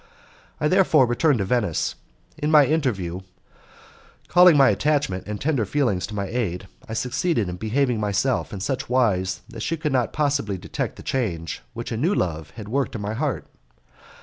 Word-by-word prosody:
I 150 - +2
therefore 165 -6 +4
returned 125 +4 +2
to 100 - -1
Venice. 105 -6 0 0.4
In 150 - -2
my 150 -2 +7
interview, 105 - -1 1.1
calling 180 -3 +7
my 135 -2 +6
attachment 145 -10 0
and 105 -1 -4
tender 140 -6 +1
feelings 115 -6 0
to 105 - -7
my 100 -1 -2
aid, 95 -5 -3 0.2
I - - -4
succeeded 125 - 0
in 90 0 -5
behaving 120 +3 0
myself 105 +5 0
in 100 - -6
such 130 +6 -2
wise 100 -7 +1
that 115 -2 -8
she 165 +8 -1
could 150 -2 -2
not 125 -3 +1
possibly 140 -9 0
detect - - -4
the - - -11
change 90 -11 -2
which 120 +1 -6
a 115 - -2
new 170 - +1
love 80 -3 -2
had 110 -3 -8
worked 135 +2 -1
in 110 - -4
my 105 +1 -3
heart. 140 +3 -2
120 Hz, 175 wpm, -23 LUFS, 100-145 Hz, 1.1 s, my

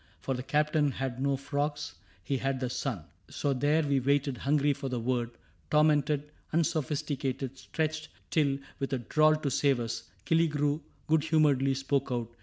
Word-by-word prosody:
For 135 - -2
the 125 - -3
Captain 150 +2 +2
had 130 -1 -3
no 140 0 +1
frogs: 145 +2 -2 0.3
he 135 - -1
had 135 0 -1
the 125 -1 -2
sun. 120 - -3 0.3
So 140 - -1
there 145 +4 +2
we 140 -2 +2
waited, 140 0 +1
hungry 145 +1 +2
for 140 -1 -5
the 125 -1 -2
word, 120 0 0 0.2
— - - -35
Tormented, 150 -1 +3 0.2
unsophisticated, 140 -4 -1
stretched 155 -1 -2
— - - -37
Till, 140 -4 +2 0.2
with 135 -1 -2
a - - +2
drawl, 155 +6 +3
to 150 -3 -2
save 135 0 +2
us, 115 -1 -4 0.2
Killigrew 150 -2 +2 0.2
Good 155 -1 +2
humoredly 145 -4 +3
spoke 135 0 0
out. 120 -2 -2
140 Hz, 170 wpm, -30 LUFS, 130-150 Hz, 0.3 s, Tormented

